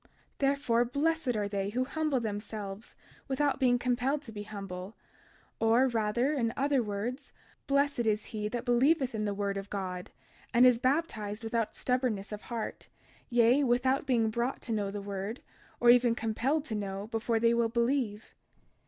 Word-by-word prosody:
32:16 - - -29 0.3
Therefore, 275 -4 +2
blessed 285 0 0
are 205 -1 0
they 200 -1 -2
who 250 +5 0
humble 305 0 0
themselves 210 -2 -5 0.3
without 280 0 0
being 250 -2 +4
compelled 250 +4 0
to 230 - -10
be 210 -1 -6
humble; 195 -1 -7 0.6
or 230 +4 +4
rather, 235 +4 +1
in 235 -6 0
other 275 -1 +2
words, 225 +6 -4 0.4
blessed 280 -4 +2
is 210 0 +1
he 210 -1 -2
that 240 +3 -4
believeth 265 +2 +3
in 215 -1 -2
the 205 - -1
word 200 -1 -1
of 195 0 -6
God, 185 -3 -4 0.5
and 245 +2 +7
is 250 -2 +5
baptized 235 -6 -1
without 225 0 -1
stubbornness 250 -6 -1
of 210 0 -5
heart, 230 -2 -5 0.4
yea, 245 +3 +4
without 260 +2 +2
being 230 -4 +2
brought 235 +4 -1
to 235 - -5
know 205 -2 -1
the 200 0 -5
word, 200 +4 -4 0.4
or 240 0 +7
even 240 -1 +4
compelled 250 +7 0
to 230 - -5
know, 200 -1 -3
before 225 0 -1
they 230 +1 +4
will 235 -1 +2
believe. 235 -2 -1
235 Hz, 170 wpm, -30 LUFS, 210-260 Hz, 0.6 s, and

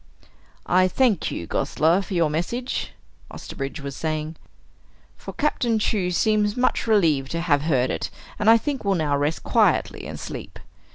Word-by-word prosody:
"I 185 +1 +4
thank 225 -2 +1
you, 85 - -5
Gosler, 165 - +1
for 190 - -5
your 165 -3 +2
message," 235 +11 -3 0.4
Osterbridge 140 +3 -6
was 140 -1 -6
saying, 155 0 -3 0.8
"for - - -9
Captain 245 -6 0
Chew 205 -4 0
seems 210 +4 +1
much 250 -1 +1
relieved 160 -11 +3
to 170 - -1
have 145 -5 +2
heard 135 -5 +1
it, - - -3 0.3
and 210 - +3
I 230 - +8
think 270 +2 -3
will 200 -1 +1
now 150 -4 0
rest 145 +3 -1
quietly - - +1
and - - -7
sleep. - - -7
175 Hz, 160 wpm, -23 LUFS, 150-215 Hz, 0.8 s, I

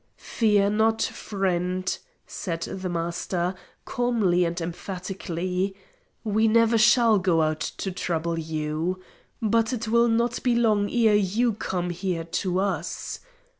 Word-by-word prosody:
"Fear 205 -3 +2
not, 220 +1 +2
friend," 185 -2 -1 0.3
said 165 -3 -5
the 185 -1 -4
Master, 175 +1 -2 0.3
calmly 215 -8 +1
and 170 +1 -2
emphatically. 185 +1 -3 0.5
"We 220 +1 +2
never 230 +1 +4
shall 220 0 +5
go 175 -3 +2
out 155 0 0 0.2
to 195 - -3
trouble 170 -2 -2
you; 160 +3 -2 0.4
but 225 +2 +2
it 230 -2 -3
will 235 +1 +4
not 235 +1 +1
be 245 -2 +2
long 215 -4 +2
ere 225 -3 +3
you 210 +4 +2
come 180 -3 -3
here 175 -1 -2
to 180 +2 -1
us. 180 -4 -3
190 Hz, 130 wpm, -25 LUFS, 175-220 Hz, 0.5 s, shall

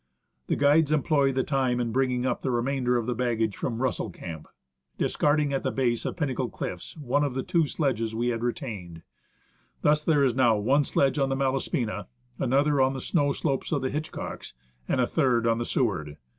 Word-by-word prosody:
The - - +1
guides 145 +2 +4
employ 145 -2 +2
the 130 0 0
time 130 -3 0
in 120 -1 -1
bringing 125 0 +1
up 125 - -1
the 135 - -2
remainder 125 0 +1
of 120 - -1
the 125 - -1
baggage 115 -3 0
from 120 0 -3
Russell 130 - -1
Camp, 80 -2 -8 0.5
discarding 145 -1 +1
at 135 - 0
the - - -1
base 120 -3 0
of - - -5
Pinnacle 130 -6 -1
Cliffs 90 - -6
one 145 0 0
of 140 -3 -2
the 130 - -1
two 165 -3 +1
sledges 115 -8 -1
we 120 +2 0
had 115 -1 -2
re 120 0 +1
tained. 95 - -8 0.8
Thus 150 0 +3
there 150 -3 +3
is 130 -3 +3
now 120 -3 +4
one 135 +8 +2
sledge 140 +2 +1
on 135 -1 +2
the 135 - 0
Malaspina, 130 -4 -1 0.3
another 140 +2 +2
on 130 +1 +3
the 135 - -4
snow 145 +1 +1
slopes 140 -1 -2
of 145 -4 0
the 130 - -1
Hitchcocks, 155 +2 -5 0.3
and - - 0
a 125 - +4
third 125 -5 +1
on 115 0 +2
the 120 - -2
Seward. 80 - -1
130 Hz, 200 wpm, -27 LUFS, 120-140 Hz, 0.8 s, guides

